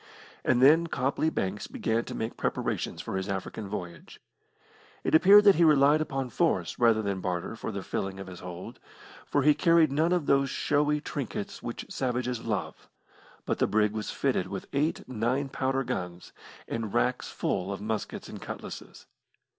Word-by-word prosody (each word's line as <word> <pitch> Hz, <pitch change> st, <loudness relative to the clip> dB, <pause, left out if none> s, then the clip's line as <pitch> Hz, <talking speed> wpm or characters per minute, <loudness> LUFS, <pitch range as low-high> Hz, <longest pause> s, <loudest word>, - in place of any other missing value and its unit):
And 125 Hz, 0 st, +3 dB
then 160 Hz, +5 st, +6 dB
Copley 140 Hz, +2 st, 0 dB
Banks 95 Hz, -6 st, -3 dB
began 115 Hz, +1 st, -1 dB
to -, -, -6 dB
make 110 Hz, -, -3 dB
preparations -, -, -2 dB
for -, -, -3 dB
his 95 Hz, +1 st, -3 dB
African 100 Hz, +2 st, -4 dB
voyage. 90 Hz, -5 st, -7 dB, 0.8 s
It -, -, -1 dB
appeared 195 Hz, +6 st, +8 dB
that 200 Hz, -1 st, +8 dB
he 170 Hz, -, +5 dB
relied 150 Hz, -1 st, +5 dB
upon 135 Hz, -4 st, -3 dB
force 125 Hz, -, 0 dB
rather 115 Hz, -2 st, +4 dB
than 100 Hz, -2 st, -2 dB
barter 90 Hz, -2 st, -3 dB
for -, -, -5 dB
the -, -, -5 dB
filling 95 Hz, 0 st, -3 dB
of 95 Hz, -, -6 dB
his 90 Hz, -2 st, -10 dB
hold, 90 Hz, 0 st, -8 dB, 0.5 s
for 145 Hz, -, +1 dB
he 150 Hz, +1 st, +6 dB
carried 165 Hz, 0 st, +4 dB
none 160 Hz, +5 st, +2 dB
of 175 Hz, -4 st, +1 dB
those 140 Hz, 0 st, +3 dB
showy 150 Hz, 0 st, +1 dB
trinkets 200 Hz, -, -5 dB
which 120 Hz, -, -5 dB
savages 125 Hz, -2 st, -2 dB
love, 95 Hz, -8 st, -4 dB, 0.6 s
but -, -, -1 dB
the -, -, +3 dB
brig 105 Hz, 0 st, +2 dB
was 110 Hz, -1 st, -4 dB
fitted -, -, 0 dB
with -, -, -6 dB
eight 150 Hz, +4 st, 0 dB
nine 130 Hz, +3 st, -1 dB
pounder 135 Hz, 0 st, -1 dB
guns, 90 Hz, -6 st, -5 dB, 0.3 s
and 115 Hz, -3 st, -4 dB
racks -, -, +1 dB
full 90 Hz, +2 st, -2 dB
of 100 Hz, -, -4 dB
muskets 110 Hz, +1 st, -4 dB
and -, -, -9 dB
cutlasses. -, -, -8 dB
125 Hz, 170 wpm, -28 LUFS, 100-150 Hz, 0.8 s, appeared